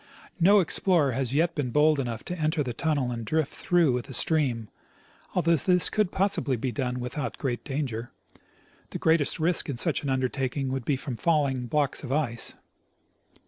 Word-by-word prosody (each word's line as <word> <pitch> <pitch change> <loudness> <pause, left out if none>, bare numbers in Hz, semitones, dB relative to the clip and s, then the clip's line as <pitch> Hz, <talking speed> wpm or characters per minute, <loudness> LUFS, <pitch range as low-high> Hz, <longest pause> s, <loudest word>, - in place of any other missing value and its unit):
No 200 +4 +6
explorer 170 -4 +2
has 130 +1 -2
yet 165 +3 +2
been 145 -6 -2
bold 150 +3 +3
enough 120 -4 -3
to 180 - -4
enter 155 -2 0
the 125 -3 -4
tunnel 140 -2 -1
and 115 -1 -4
drift 155 +5 -1
through 175 -6 +2
with 125 -1 -2
the 135 - -3
stream, 130 -9 +2 0.7
although 170 +1 +3
this 180 +1 +2
could 210 -4 +1
possibly 190 -9 0
be 125 +3 -2
done 125 +2 -2
without 125 0 -4
great 125 -3 -3
danger. 130 -5 -3 0.8
The - - -5
greatest 160 -3 +2
risk 165 0 +1
in 135 - -3
such 155 +5 +1
an 145 - -3
undertaking 130 +1 -1
would 130 -3 -3
be 145 - +1
from 130 -3 -5
falling 140 -6 +1
blocks 145 +2 0
of 135 - -6
ice. 135 -6 0
140 Hz, 180 wpm, -27 LUFS, 125-160 Hz, 0.8 s, No